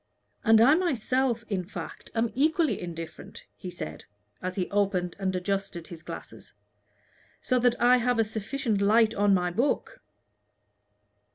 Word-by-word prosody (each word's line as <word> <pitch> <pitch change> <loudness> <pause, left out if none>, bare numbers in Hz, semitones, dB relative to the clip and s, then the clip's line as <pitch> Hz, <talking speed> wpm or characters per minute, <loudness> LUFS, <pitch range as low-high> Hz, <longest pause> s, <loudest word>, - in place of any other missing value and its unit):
"And 225 -1 +6
I 260 +6 +7
myself, 260 - 0
in 195 -4 -2
fact, 180 - -8
am 225 0 +1
equally 310 +4 +1
indifferent," 165 -2 -8
he 185 - -8
said, 80 - -7 0.4
as 185 0 -4
he 185 -2 -1
opened 195 -3 0
and 190 -1 -1
adjusted 195 -2 -3
his 170 -2 -9
glasses, - - -10 0.8
"so 255 -1 +1
that 245 0 +2
I 245 +1 +6
have 245 0 +1
a 225 - +4
sufficient 220 0 -2
light 220 +2 +4
on 205 -1 +3
my 180 -1 0
book." 250 +10 -1
215 Hz, 145 wpm, -27 LUFS, 185-245 Hz, 0.8 s, I